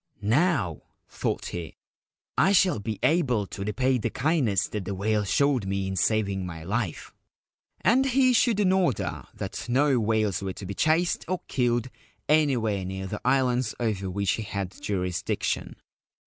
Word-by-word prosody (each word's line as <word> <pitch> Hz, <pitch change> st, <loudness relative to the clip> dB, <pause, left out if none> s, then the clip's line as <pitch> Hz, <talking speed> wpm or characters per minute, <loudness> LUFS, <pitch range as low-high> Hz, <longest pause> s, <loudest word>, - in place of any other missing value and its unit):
'Now/ 110 Hz, -, +1 dB, 0.3 s
thought -, -, -3 dB
he, 85 Hz, -2 st, -6 dB, 0.3 s
' -, -, -70 dB
1 195 Hz, -, +4 dB
shall 185 Hz, -, +4 dB
be 110 Hz, 0 st, -4 dB
able 130 Hz, -, +2 dB
to 100 Hz, +1 st, -6 dB
repay 125 Hz, +5 st, +1 dB
the -, -, -1 dB
kindness 130 Hz, -, +1 dB
that 105 Hz, -3 st, -4 dB
the 100 Hz, -, -3 dB
whale 105 Hz, +2 st, 0 dB
showed 130 Hz, +1 st, +1 dB
me 95 Hz, 0 st, -1 dB
in 95 Hz, 0 st, -3 dB
saving 100 Hz, 0 st, +1 dB
my 85 Hz, -3 st, -7 dB
life! 100 Hz, -1 st, -3 dB, 0.3 s
' -, -, -70 dB, 0.3 s
And 260 Hz, +4 st, +4 dB
he 260 Hz, 0 st, +4 dB
issued 235 Hz, -3 st, +3 dB
an 185 Hz, -2 st, +3 dB
order 185 Hz, -9 st, 0 dB
that -, -, -6 dB
no 135 Hz, +1 st, +3 dB
whales 110 Hz, -3 st, +1 dB
were 95 Hz, -1 st, -3 dB
to 100 Hz, -, -9 dB
be 100 Hz, -, -4 dB
chased 160 Hz, -, +1 dB
or 185 Hz, 0 st, -2 dB
killed 120 Hz, -1 st, 0 dB, 0.4 s
anywhere 125 Hz, -10 st, +2 dB
near 95 Hz, +1 st, -5 dB
the 100 Hz, +2 st, -5 dB
islands 125 Hz, -3 st, +1 dB
over 105 Hz, -5 st, -1 dB
which 100 Hz, +1 st, 0 dB
he -, -, -2 dB
had 100 Hz, -3 st, -4 dB
jurisdiction. 90 Hz, -3 st, -2 dB
110 Hz, 165 wpm, -26 LUFS, 100-140 Hz, 0.4 s, 1